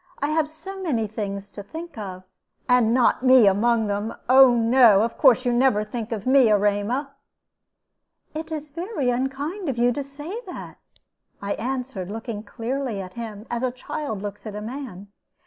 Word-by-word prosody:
I 285 - -1
have 310 -1 +1
so 380 +5 -9
many 255 -12 0
things 200 -2 -5
to 205 - -8
think 325 +12 -9
of." 190 -4 -7 0.4
"And 250 -3 +4
not 245 0 +3
me 255 -3 +7
among 220 +3 +3
them. 205 +2 -2
Oh 260 -1 +7
no, 230 -3 +5
of 230 - -2
course 255 -2 +4
you 245 - +2
never 240 -4 +3
think 220 +1 -6
of 215 -3 -4
me, 260 -2 +5
Erema." 210 +7 +1 1.2
"It 320 +1 -6
is 305 -1 -5
very 335 - -2
unkind 280 +9 -3
of 255 - -2
you 240 +1 +3
to 285 - -3
say 295 - -7
that," - - -9 0.6
I 200 0 -2
answered, 250 -6 -4
looking 220 0 -5
clearly 235 +1 -4
at 185 -1 -7
him, 220 -3 -7
as 240 -1 -2
a 255 - +1
child 250 -4 -5
looks 205 +2 -7
at 210 - -6
a - - -4
man. 220 -5 -7
240 Hz, 175 wpm, -24 LUFS, 210-275 Hz, 1.2 s, me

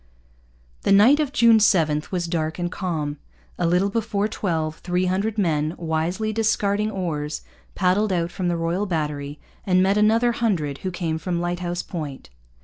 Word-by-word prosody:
The - - 0
night 225 +9 +6
of 295 -3 0
June 230 -4 +5
7 160 -7 +3
was 180 -2 -2
dark 160 -2 -2
and 175 0 -2
calm. 155 -7 -3 0.4
A 170 - +2
little 180 +4 +2
before 215 -2 0
twelve 160 -7 -2
three 180 +1 -1
hundred 200 +4 -1
men, 155 -5 0
wisely 175 +6 -1
discarding 210 -1 +1
oars, 155 -7 -3 0.3
paddled 195 +2 +2
out 170 -1 0
from 180 0 -3
the 175 -1 0
Royal 170 +5 -1
Battery 150 -4 -3 0.2
and 185 -1 +3
met 195 +2 +2
another 225 +3 +4
hundred 180 -13 -1
who 190 - -3
came 170 -3 -3
from 175 0 -2
Lighthouse 175 0 -2
Point. 150 - -7
180 Hz, 160 wpm, -23 LUFS, 160-205 Hz, 0.4 s, night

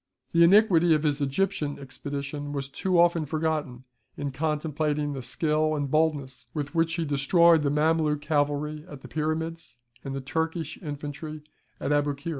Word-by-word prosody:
The 170 0 +5
iniquity 175 -3 +6
of 150 - -1
his 145 -1 +1
Egyptian 150 +2 -1
expedition 140 +1 -5
was 140 -1 -3
too 180 +5 0
often 170 -2 +3
forgotten 155 -4 -2 0.3
in 145 -1 -3
contemplating 150 0 -1
the 135 - -5
skill 155 +4 0
and 145 -2 -2
boldness 140 -6 0
with 145 -1 -3
which 165 -1 +1
he 170 -2 -1
destroyed 160 +3 +4
the 145 - +1
Mameluke 150 0 +2
cavalry 150 0 -1
at 145 -3 -10
the - - -10
Pyramids, 160 -1 -3 0.3
and 135 -1 -5
the - - -2
Turkish 160 +3 -3
infantry 150 0 -6 0.4
at 140 - -2
Aboukir. 145 +1 0
150 Hz, 155 wpm, -27 LUFS, 145-160 Hz, 0.4 s, iniquity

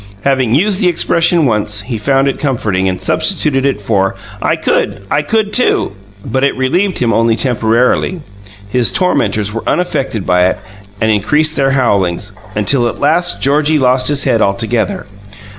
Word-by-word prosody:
Having 130 -4 +1
used 195 +5 +1
the 185 - +3
expression 170 -1 +2
once, 105 -3 0
he 110 +2 -5
found 135 +4 +1
it 135 - -2
comforting, 105 -9 -1
and 90 - -4
substituted 150 -8 +1
it 135 - -1
for: 100 -2 0 0.3
"I - - +1
could! 100 0 -1
I 145 - +2
could, 215 +5 -1
too!" 250 - +1 0.3
But 130 +4 -1
it 140 - +1
relieved 175 +9 0
him 115 -2 0
only 115 0 +2
temporarily. 125 +8 +1 0.5
His 120 +3 +1
tormentors 105 - 0
were 115 - -3
unaffected 135 - -2
by 90 0 +3
it 95 - -2 0.4
and 110 -1 +1
increased 150 +10 +1
their 135 -1 +1
howlings, 105 -7 0 0.2
until 120 +4 +1
at - - -5
last 165 +5 +1
Georgie 150 +3 +2
lost 130 -1 +2
his 145 -1 +2
head 120 -5 +1
altogether. 105 +2 -1
125 Hz, 160 wpm, -13 LUFS, 105-150 Hz, 0.5 s, the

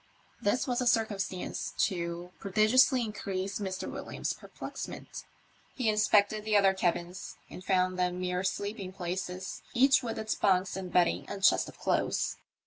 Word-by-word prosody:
This 205 +6 +1
was 250 -1 0
a 250 - 0
circumstance 200 -5 -1
to 175 -2 -4
prodigiously 230 +6 +4
increase 195 -3 -3
Mr. 190 -2 -3
Williams's - - -4
perplexment. - - -8 0.5
He 245 -4 +1
inspected 210 0 +3
the 215 -1 +3
other 195 -1 +5
cabins 175 0 -2 0.2
and 180 - -9
found 185 -1 +1
them 180 0 0
mere 180 0 -1
sleeping 200 0 -3
places, 180 0 -4
each 270 +3 +5
with 230 -2 -4
its 220 0 -1
bunks 190 -1 +2
and 185 -2 -5
bedding 175 0 +2
and 200 -1 -6
chest - - +4
of - - -14
clothes. - - 0
195 Hz, 145 wpm, -30 LUFS, 180-215 Hz, 0.5 s, other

